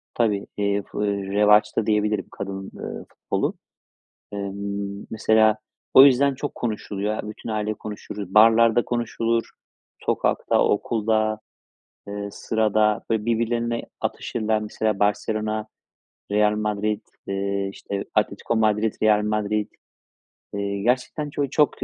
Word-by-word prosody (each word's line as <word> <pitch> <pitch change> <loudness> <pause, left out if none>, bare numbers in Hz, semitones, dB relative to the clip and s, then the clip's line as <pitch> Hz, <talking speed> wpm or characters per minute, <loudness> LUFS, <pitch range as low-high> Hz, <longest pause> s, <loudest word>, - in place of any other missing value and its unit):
tabii, 105 -4 +1
eee, 100 0 +1
fu 105 - -3
eee, 100 - +1 0.2
revaçta 105 +1 +4
diyebilirim, 105 0 +1
kadın, 95 -1 -6
eee, - - -7
futbolu. - - -2 0.8
Emm, 100 0 -4
mesela, 110 -1 +3 0.4
o 130 - +11
yüzden 140 0 +5
çok 145 +2 -5
konuşuluyor, 105 -2 -3
aaa, 105 - -5
bütün 110 - -9
aile 110 0 -1
konuşuruz. 105 -2 -7
Barlarda 115 +2 +6
konuşulur. 115 -1 -1 0.5
Sokakta, - - +1
okulda, 110 0 +1 0.7
eee, 100 0 -4
sırada. 110 -1 +1
Böyle, 110 -1 +1
birbirlerine 115 0 0 0.2
atışırlar, 110 -2 -1
mesela, 105 -1 -1
Barselona, 110 +1 0 0.7
Real 105 0 +3
Madrid, 105 0 -1 0.3
eee, 100 0 -1
işte, 100 0 -5
Atletico 115 - 0
Madrid, 110 0 +2
Real 105 -1 +4
Madrid. 105 0 -1 0.8
Eee, 100 0 -2
gerçekten 130 +6 0
ço 145 -1 -1
çok, 145 -1 +1
105 Hz, 115 wpm, -24 LUFS, 105-110 Hz, 0.8 s, o